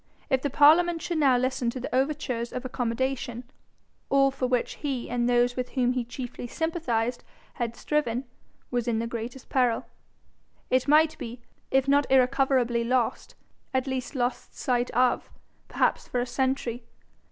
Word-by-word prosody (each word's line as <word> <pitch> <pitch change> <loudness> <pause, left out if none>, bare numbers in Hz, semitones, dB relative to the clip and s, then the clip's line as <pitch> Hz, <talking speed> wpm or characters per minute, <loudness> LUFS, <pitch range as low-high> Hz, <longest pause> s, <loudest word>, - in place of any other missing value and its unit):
If 265 -1 +3
the 285 - -1
parliament 325 +5 +5
should 345 -2 -1
now 270 -4 +5
listen 255 -1 0
to 250 +1 -4
overtures 260 -4 -1
of 255 +1 -5
accommodation, 245 0 -2 0.7
all 275 0 +4
for 265 -1 -2
which 250 -1 -1
he 270 -5 -3
and 245 0 +1
those 245 0 +3
with 250 -1 -4
whom 250 -1 +3
he 250 -1 -1
chiefly 245 0 -7
sympathised 250 -7 -1 0.4
had 235 -1 -1
striven, 255 -5 -1 0.5
was 245 -1 -1
in 230 -2 +1
the 230 - -1
greatest 235 +2 -6
peril, 245 -3 +1 0.9
and 255 +1 +2
might 310 +2 +5
be, 235 +1 -7 0.3
if 270 0 +2
not 285 0 +3
irrecoverably 260 -2 +3
lost, 245 0 -1 0.4
at 260 0 +1
least 265 +1 -4
lost 245 -1 -2
sight 245 -1 0
of, 250 +1 +1 0.4
perhaps - - 0
for 250 - -1
a 245 - 0
century. 250 -1 -1
255 Hz, 155 wpm, -27 LUFS, 240-270 Hz, 0.9 s, parliament